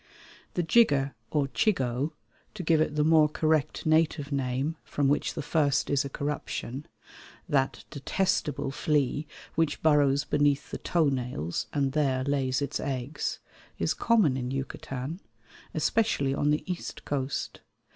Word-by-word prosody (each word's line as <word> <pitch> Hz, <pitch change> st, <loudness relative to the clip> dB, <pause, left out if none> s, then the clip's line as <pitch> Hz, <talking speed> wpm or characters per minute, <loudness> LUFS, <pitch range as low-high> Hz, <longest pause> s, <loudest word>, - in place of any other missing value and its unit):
The 175 Hz, -, +1 dB
jigger 145 Hz, -9 st, +4 dB, 0.2 s
or 145 Hz, -3 st, +1 dB
chigoe 135 Hz, -, 0 dB, 0.4 s
(to 190 Hz, -, -5 dB
give 160 Hz, -1 st, +3 dB
it 150 Hz, -1 st, 0 dB
the 150 Hz, -, +3 dB
more 155 Hz, -1 st, +5 dB
correct 155 Hz, -1 st, 0 dB
native 155 Hz, -2 st, +2 dB
name 135 Hz, +3 st, -1 dB
from 145 Hz, -2 st, 0 dB
which 145 Hz, +2 st, +1 dB
the -, -, -3 dB
first 145 Hz, -4 st, +1 dB
is 140 Hz, 0 st, +3 dB
a 140 Hz, -, -5 dB
corruption), 145 Hz, -1 st, -4 dB, 0.6 s
that 135 Hz, -2 st, 0 dB
detestable 145 Hz, -2 st, -1 dB
flea 145 Hz, 0 st, 0 dB, 0.3 s
which 160 Hz, -2 st, 0 dB
burrows 145 Hz, -2 st, +4 dB
beneath 145 Hz, -2 st, +1 dB
the -, -, -4 dB
toenails 125 Hz, -, 0 dB
and 140 Hz, -2 st, +1 dB
there 135 Hz, -3 st, +1 dB
lays 135 Hz, -1 st, 0 dB
its 140 Hz, -, -2 dB
eggs, 135 Hz, +1 st, -3 dB, 0.4 s
is -, -, +1 dB
common 205 Hz, -, +3 dB
in 125 Hz, -1 st, -3 dB
Yucatan, 135 Hz, +3 st, -4 dB, 0.5 s
especially 145 Hz, -12 st, +1 dB
on 145 Hz, +1 st, +1 dB
the 150 Hz, +1 st, +1 dB
east 180 Hz, -2 st, -5 dB
coast. 140 Hz, -1 st, -2 dB
145 Hz, 135 wpm, -28 LUFS, 135-155 Hz, 0.6 s, more